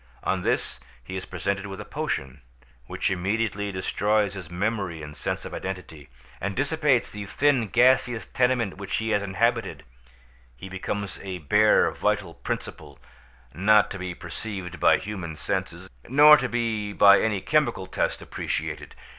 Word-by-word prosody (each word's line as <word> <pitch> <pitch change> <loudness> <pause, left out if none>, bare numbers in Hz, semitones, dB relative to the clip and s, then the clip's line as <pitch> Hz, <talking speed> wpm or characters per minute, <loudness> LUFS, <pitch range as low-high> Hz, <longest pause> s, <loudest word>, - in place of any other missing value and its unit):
On 95 -1 0
this - - -1 0.2
he 95 +9 -7
is 95 - -5
presented 100 +3 -3
with 95 0 -7
a 105 - -7
potion, 75 - -4 0.5
which - - -1
immediately 100 +2 -1
destroys 100 +2 0
his 95 -5 -8
memory 90 -3 -2
and 75 0 -9
sense - - -3
of - - -7
identity, 85 -7 -7 0.3
and 100 +1 -3
dissipates 140 -2 +1
the 105 -1 -7
thin 135 -1 +2
gaseous 125 0 +3
tenement 125 -6 0
which 100 -1 -4
he 110 0 -1
has 105 -1 +2
inhabited: 100 - -1 0.7
he 95 - -9
becomes 95 +1 -4
a 95 -2 -5
bare 75 -5 +4
vital 105 -5 -1
principle, - - -6 0.6
not 105 +5 +4
to 95 - -5
be 90 -1 -5
perceived 90 +1 -6
by - - +5
human 95 -6 -6
senses, 75 - -3 0.2
nor 150 +3 +9
to 130 -4 -1
be 110 -4 -2
by 100 0 +7
any 110 -3 0
chemical 120 -5 +1
test 95 - -2
appreciated. - - -4
100 Hz, 150 wpm, -25 LUFS, 95-115 Hz, 0.7 s, nor